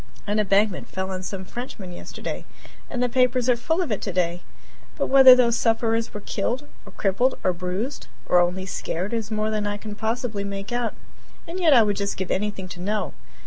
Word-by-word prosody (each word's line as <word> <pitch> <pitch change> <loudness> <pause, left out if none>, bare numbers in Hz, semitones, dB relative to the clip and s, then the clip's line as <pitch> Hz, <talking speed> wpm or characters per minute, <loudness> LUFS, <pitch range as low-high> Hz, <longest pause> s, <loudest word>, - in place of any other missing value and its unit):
An 210 +1 0
embankment 200 -1 +2
fell 190 0 -4
on 185 -1 -3
some 190 +1 -5
Frenchmen 220 -5 -7
yesterday, 175 - -6 0.5
and 250 -2 -1
the - - +3
papers 250 0 +2
are 250 - +5
full 320 +9 0
of 315 - -5
it 210 - -1
today 175 -3 -1 0.6
but - - -1
whether 265 -1 +10
those 235 -2 +3
sufferers 225 0 +1
were 210 - -7
killed, 245 +9 -2 0.2
or - - -10
crippled, 215 +7 +1
or 185 - +2
bruised, 185 +10 -4 0.2
or 180 - +4
only 180 +2 +1
scared 190 +1 -3
is 225 -2 -2
more 215 0 -1
than 210 -1 -1
I 205 0 -2
can 210 0 -7
possibly 220 -1 -2
make 200 +1 -5
out, 240 -2 -1 0.5
and 345 +3 -5
yet 320 -6 +6
I 235 - +7
would 205 -2 0
just 200 0 -2
give 190 -2 -3
anything 200 -1 -2
to 175 - -8
know. 210 +3 -1
210 Hz, 200 wpm, -24 LUFS, 190-240 Hz, 0.6 s, whether